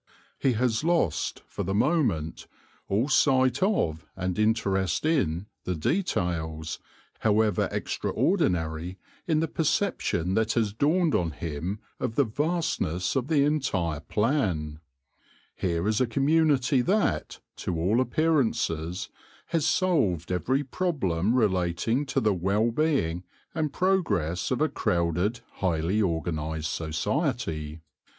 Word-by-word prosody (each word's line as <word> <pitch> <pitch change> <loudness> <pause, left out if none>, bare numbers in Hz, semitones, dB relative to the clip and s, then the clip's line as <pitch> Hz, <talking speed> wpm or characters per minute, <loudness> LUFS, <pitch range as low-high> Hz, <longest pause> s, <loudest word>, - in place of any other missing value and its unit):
He 135 - +2
has 115 +1 0
lost, 165 - 0
for - - -6
the 95 +2 -1
mo 150 +10 +3
ment, 80 - -2 0.4
all 105 +7 +1
sight 130 -2 +3
of 90 - +1
and 95 0 -2
interest 100 - +1
in 100 - +1 0.2
the 90 - -2
details, 80 - -1 0.4
however 105 -2 +2
extraordinary, 85 +1 -1 0.3
in 160 -2 +2
the 165 - +1
perception 155 - 0
that 110 +2 +1
has 110 -4 0
dawned 155 - +2
on 85 -2 +1
him 80 +6 -4 0.2
of 110 - -2
the 140 - +4
vastness 140 - -1
of 130 -1 0
the 150 -3 +3
entire 100 - 0
plan, 95 - -1 0.8
Here 85 0 -1
is 110 +2 +1
a 130 - +3
community 140 0 +3
that, 180 - 0 0.2
to 85 -3 -3
all 100 +9 +2
appearances, 115 - 0 0.4
has 165 -2 +1
solved 135 - +1
every 130 +10 0
problem 120 - 0
relating 105 - +1
to 135 - +1
the 110 - +2
w 90 0 -3
r - - +2
ell 110 +3 +2
being 115 - 0 0.3
and 155 -3 -1
progress 150 - 0
of - - -1
a - - +4
crowded, 90 +7 0 0.2
highly 90 +3 +1
organised 80 -3 -2
society. 80 - -2
105 Hz, 125 wpm, -27 LUFS, 85-140 Hz, 0.8 s, the